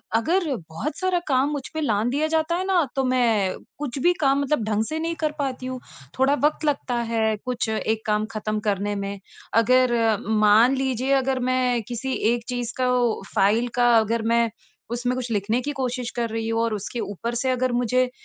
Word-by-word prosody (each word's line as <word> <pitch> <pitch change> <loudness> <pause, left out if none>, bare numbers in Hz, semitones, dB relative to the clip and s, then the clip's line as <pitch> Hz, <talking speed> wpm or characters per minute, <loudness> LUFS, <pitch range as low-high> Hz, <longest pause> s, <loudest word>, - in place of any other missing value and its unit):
अगर 340 +10 +2 0.2
बहुत 280 - -4
सारा 370 -2 +1
काम 270 +1 +2
मुझ 290 -2 -2
पे 315 - -2
लाँघ 220 -4 +1
दिया 305 +3 +1
जाता 320 +2 +1
है 370 +1 -2
ना 370 -4 +3
तो 270 - +1
मैं 220 -7 +2 0.2
कुछ 275 -2 -4
भी 355 - +5
काम 275 +1 +3
मतलब 280 -4 0
ढंग 215 0 +1
से 315 +1 -2
नहीं 330 +1 -2
कर 305 - +2
पाती 260 -2 -3
हूँ। 255 0 -4 0.4
थोड़ा 270 +2 +4
वक़्त 310 +1 0
लगता 270 -4 0 0.2
है 220 -1 +2
कुछ 245 -3 -2
एक 220 0 -1
काम 210 0 +1
ख़त्म 215 0 -2
करने 205 +1 -1
में 200 0 -4 0.4
अगर 255 0 +3 0.5
मान 230 +6 +6
लीजिए 265 0 0
अगर 265 -1 0
मैं 250 -2 +1
किसी 250 +2 -3 0.2
एक 235 -1 -3
चीज़ 245 -1 -3
का 255 -1 +1
वो 240 -4 +1
फ़ाइल 220 +5 +3
का 240 -1 +5
अगर 225 +1 0
मैं 235 -1 +3 0.4
उसमें 245 +1 -1
कुछ 250 -2 -4
लिखने 215 +3 0
की 290 - -3
कोशिश 250 -2 -2
कर 235 -1 -2
रही 225 0 -3
हूँ 225 0 +1
और 230 -1 0
उसके 210 +4 -4
ऊपर 230 +4 -4
से 260 +2 0
अगर 255 0 0
मुझे 250 +1 +1
245 Hz, 200 wpm, -24 LUFS, 225-270 Hz, 0.5 s, मान